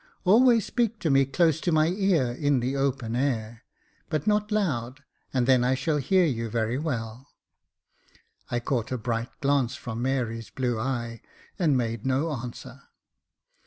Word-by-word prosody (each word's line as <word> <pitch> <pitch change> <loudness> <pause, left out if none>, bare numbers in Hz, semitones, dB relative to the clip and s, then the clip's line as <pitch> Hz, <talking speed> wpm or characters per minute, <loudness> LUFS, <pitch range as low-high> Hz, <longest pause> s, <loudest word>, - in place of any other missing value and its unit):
Always 230 +3 +5
speak 230 -2 0
to 160 - +1
me 135 0 +5
close 160 +2 +2
to 175 - 0
my 155 0 +3
ear 180 -9 +1
in 145 +1 +1
the 125 +3 -2
open 135 -4 -1
air, 120 -3 -2 0.4
but 155 -2 -1
not 210 0 +1
loud, 140 - -1 0.3
and 125 -2 +1
then 130 -1 +4
I 130 +1 +2
shall 150 +4 0
hear 180 +6 +3
you 115 -6 -2
very 115 +3 -1
well." 125 -4 -4 1.2
I 120 - -1
caught 120 -2 -2
a 130 - -1
bright 115 0 -2
glance 140 -3 +1
from 115 -3 -6
Mary's 120 -3 -2
blue 120 -3 -2
eye, 115 -1 -3 0.4
and 155 -7 +3
made 115 -2 -2
no 135 +5 0
answer. 125 -4 -7
130 Hz, 160 wpm, -26 LUFS, 120-155 Hz, 1.2 s, Always